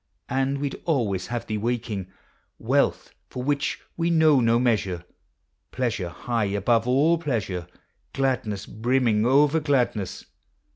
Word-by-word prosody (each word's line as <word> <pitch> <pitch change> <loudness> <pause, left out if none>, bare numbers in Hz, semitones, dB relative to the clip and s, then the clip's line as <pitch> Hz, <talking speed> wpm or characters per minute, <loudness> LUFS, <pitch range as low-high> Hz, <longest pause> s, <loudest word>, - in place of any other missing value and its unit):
And 135 +1 0
we'd 140 -1 -4
always 110 - 0
have 120 -1 -3
thee 110 -2 -3
waking; 115 -4 -2 0.5
Wealth - - 0 0.2
for 125 - -5
which 145 +1 -1 0.2
we 170 0 0
know 160 -4 +5
no 115 -1 +3
measure 105 -8 0 0.7
Pleasure 120 -8 -2
high 115 +5 -2
above 105 +4 +1
all 150 +7 +3
pleasure; 105 - -2 0.4
Gladness 120 -7 -1
brimming 115 -1 +1
over 145 +4 +4
gladness; 125 - 0
ABOUT - - -21
CHILDREN. - - -37
120 Hz, 135 wpm, -25 LUFS, 105-135 Hz, 0.7 s, know